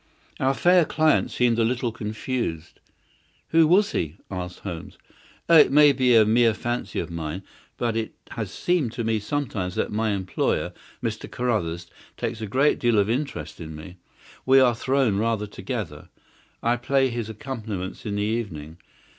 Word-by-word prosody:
Our 135 +1 +2
fair 180 +2 +5
client 155 0 +2
seemed 120 -2 +1
a - - +4
little 120 +1 0
confused. 110 -6 -4 0.7
"Who 160 -1 +5
was 200 +5 +4
he?" 80 +2 -2
asked 90 -1 -5
Holmes. 85 +1 -7 0.5
"Oh, 170 - +6
it 150 - +7
may 150 +1 +7
be 125 -2 +3
a 110 -1 +7
mere 115 0 +4
fancy 120 -3 -3
of 85 - -4
mine; 85 +3 -5 0.3
but 115 -2 -1
it 115 -1 -3 0.2
has 110 -4 -4
seemed 150 - 0
to 120 - -3
me 110 -1 +1
sometimes 105 -7 -3
that - - -1
my 110 +1 0
employer, 95 -2 -1 0.3
Mr. - - -3
Carruthers, 90 -9 -1 0.3
takes 110 - -3
a 110 - -3
great 135 +8 +2
deal 120 -2 +2
of 100 +2 +3
interest 140 - -4
in 80 -1 -7
me. 90 +4 -10 0.5
We 135 +1 +6
are 125 -2 +5
thrown 130 -3 +1
rather 110 0 0
together. 95 - -6 0.5
I 120 +1 +2
play 135 +2 +2
his 115 -2 -4
accompaniments 110 -6 -6
in 105 -4 -3
the 105 - 0
evening. 90 -9 -3
115 Hz, 165 wpm, -24 LUFS, 95-130 Hz, 0.7 s, it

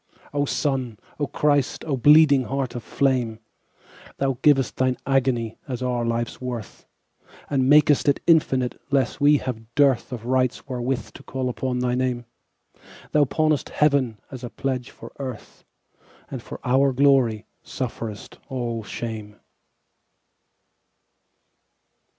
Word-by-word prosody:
O 145 0 +1
Sun, 130 -6 -1 0.2
O 145 - 0
Christ, 145 -2 0
O 150 -4 0
bleeding 145 0 +6
Heart 135 -1 -2
of 120 - -5
flame! 125 -4 0 0.8
Thou 135 -1 +1
giv'st 135 -3 +3
Thine 130 -1 +1
agony 130 -4 0
as 130 -2 -4
our 125 -1 0
life's 115 +1 -2
worth, 120 -5 -6 0.6
And 130 -2 +2
mak'st 150 -1 +5
it 140 - +2
infinite, 135 -7 +2
lest 135 0 0
we 145 +1 +6
have 120 -3 -6
dearthOf 130 -4 +2
rights 130 0 0
wherewith 125 0 -3
to - - -12
call 130 -1 -3
upon 125 +1 -2
thy 125 0 0
Name; 125 -1 -1 0.9
Thou 150 -1 +4
pawnest 155 +1 0
Heaven 140 -7 +1
as 130 -2 -8
a 120 - -4
pledge 130 -1 -3
for - - -12
Earth, 130 -5 -7 0.7
And - - -5
for - - -9
our 135 +2 +3
glory 125 -5 +3 0.2
sufferest 115 -4 -6
all 120 -4 -3
shame. 110 -1 -6
130 Hz, 125 wpm, -24 LUFS, 120-140 Hz, 0.9 s, bleeding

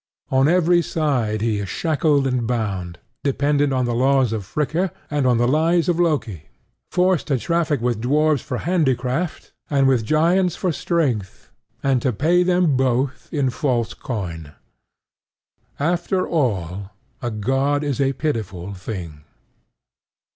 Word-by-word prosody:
On 135 +1 +4
every 175 +1 +4
side 125 -11 -1
he 110 -2 0
is 100 -2 -4
shackled 150 -3 +1
and 125 -3 0
bound, 100 -8 -2 0.3
dependent 145 +1 +1
on 130 -1 +1
the 120 - -1
laws 130 -1 +2
of 110 -2 -3
Fricka 160 - -1 0.2
and 145 -3 +1
on 125 -2 +3
the 120 +1 +2
lies 165 +5 +2
of 175 -1 +1
Loki, 130 - -1 0.4
forced 180 -2 +1
to 140 -4 +1
traffic 160 -1 0
with 120 -2 -1
dwarfs 150 +2 +2
for 125 - -4
handicraft 145 -1 -1 0.2
and 140 -2 +3
with 130 -4 +3
giants 170 - +2
for 185 - -1
strength, 130 - -2 0.3
and 135 -3 +2
to 130 - +1
pay 165 - +2
them 180 -4 +2
both 130 +1 0
in 140 -5 0
false 120 -3 -1
coin. 85 - -6 1.3
After 175 +4 0
all, 100 - -2 0.3
a 120 - -2
god 135 +7 0
is 140 -2 -1
a 135 0 +2
pitiful 100 - -3
thing. 90 -6 -7
135 Hz, 140 wpm, -21 LUFS, 115-155 Hz, 1.3 s, On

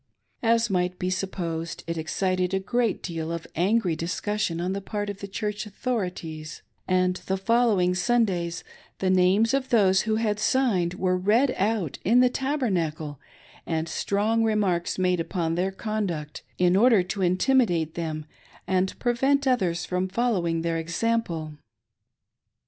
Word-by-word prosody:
As 230 0 +3
might 180 -2 0
be 180 0 -2
supposed, 170 -3 -3
it 170 - -3
excited 185 +3 -1
a - - +1
great 235 +2 -1
deal 165 -2 -4
of 170 -1 -4
angry 185 0 +2
discussion 180 +2 -2
on 180 +2 -1
the 200 - -3
part 205 +1 -3
of 200 - -11
the 200 - -6
Chiu"ch 210 +1 -3
authorities; 180 -9 -4 0.2
and 185 0 +2
the 190 - 0
following 210 -4 +2
Sundays 180 -4 0 0.3
the 190 -1 +1
names 190 +5 +3
of 270 -1 0
those 195 -6 +4
who 220 0 0
had 215 -2 0
signed 210 -9 +1
were 185 -1 +1
read 225 +8 +3
out 200 -6 -1
in 235 +5 +4
the 250 0 +5
Tabernacle, 175 - -2 0.5
and 160 -1 -1
strong 215 +6 0
remarks 200 -6 0
made 180 -1 +1
upon 165 0 -1
their 180 +3 0
conduct, 190 -7 -3 0.2
in 180 0 +3
order 220 -2 +5
to 195 +2 -4
intimidate 180 - +2
them 155 -3 -4 0.4
and 190 0 0
prevent 270 +3 +1
others 185 -10 +1
from 180 +1 -1
following 185 -6 0
their 165 -1 0
example. 170 -2 -1
190 Hz, 145 wpm, -26 LUFS, 170-220 Hz, 0.5 s, the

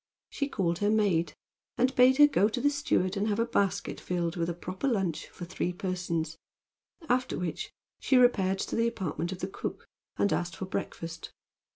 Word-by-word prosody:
She 280 0 -2
called 175 -8 0
her 205 - +2
maid, 185 -7 +2 0.4
and 255 +1 +2
bade 255 +1 +6
her 295 - +9
go 220 -7 +3
to 235 - -3
the 285 +3 +3
steward 210 -10 0
and 205 +2 0
have 205 -1 0
a 230 - +2
basket 200 -4 0
filled 175 -2 -2
with 170 -1 -1
a - - -1
proper 185 +9 -4
lunch 195 - 0
for 175 - -9
three 180 0 -2
persons, 175 -4 -3 0.7
after 250 +1 +1
which 175 -3 -4 0.3
she 265 - +3
repaired 195 -7 +4
to - - -3
the 230 0 +2
apartment 180 -6 -3
of 185 - -6
the 185 - -1
cook 195 - -6 0.3
and 200 - +2
asked 175 0 -2
for 190 - -5
breakfast. 165 -3 -5
190 Hz, 190 wpm, -29 LUFS, 175-230 Hz, 0.7 s, her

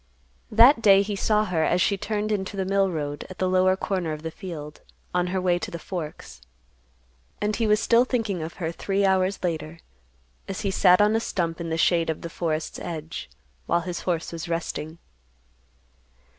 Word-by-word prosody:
That 235 +3 +7
day 200 -2 +6
he 205 0 -3
saw 215 +2 +2
her 170 -5 0
as 180 - +2
she 200 - +2
turned 210 +2 -2
into 200 -1 -2
the 190 - -1
mill 195 0 +2
road 145 -4 -4
at 185 - -10
the 185 - 0
lower 185 0 +3
corner 185 -5 -2
of 155 0 -8
the 160 - -4
field, 155 -4 -8 0.3
on 180 0 +1
her 185 +1 -1
way 180 -1 +1
to - - -5
the 170 - -6
Forks. 160 - -7 1.0
And 210 0 0
he 225 -1 0
was 210 0 +4
still 230 +1 +4
thinking 225 -8 -1
of 160 +2 -5
her 165 -3 -3
three 195 +3 0
hours 190 0 +1
later, 160 -2 -3 0.7
as 195 - -4
he 200 -2 -1
sat 180 0 +5
on 210 +1 +4
a - - +3
stump 170 -6 -2
in 165 - -4
the 160 - -1
shade 165 0 +2
of 160 - -2
the 170 - -6
forest's 160 -2 -3
edge, 160 - -6 0.4
while 170 - +2
his 175 0 -4
horse 170 -3 -2
was 165 0 -6
resting. 165 -1 -3
180 Hz, 195 wpm, -25 LUFS, 165-200 Hz, 1.0 s, That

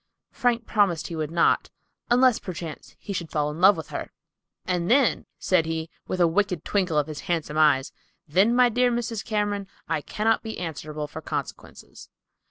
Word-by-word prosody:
Frank 240 -3 0
promised 200 -7 +1
he 170 - -5
would 155 -2 -2
not, 170 +1 +2 0.4
unless 245 -1 +4
perchance 170 -4 -7
he 200 - -6
should 170 -3 -4
fall 150 -1 0
in 155 +3 -7
love 195 +2 +7
with - - -7
her, - - -5 0.5
"And 180 -1 -1
then," 260 0 +3
said 170 -4 +2
he, 160 0 -3 0.2
with 185 - -3
a 175 - +6
wicked 180 0 0
twinkle 185 -6 0
of 150 - +3
his 155 -1 -7
handsome 160 -3 -1
hazel 155 - +6
eyes, 135 -2 0 0.3
"then, 195 +10 +3
my 250 0 +6
dear 245 +2 +2
Mrs. 235 -2 -2
Cameron, 205 -2 -1 0.2
I 160 -2 -1
cannot 220 +7 0
be 220 -1 -6
answerable 155 -2 -5
for 155 +2 -8
consequences." - - -7
180 Hz, 180 wpm, -25 LUFS, 160-220 Hz, 0.5 s, love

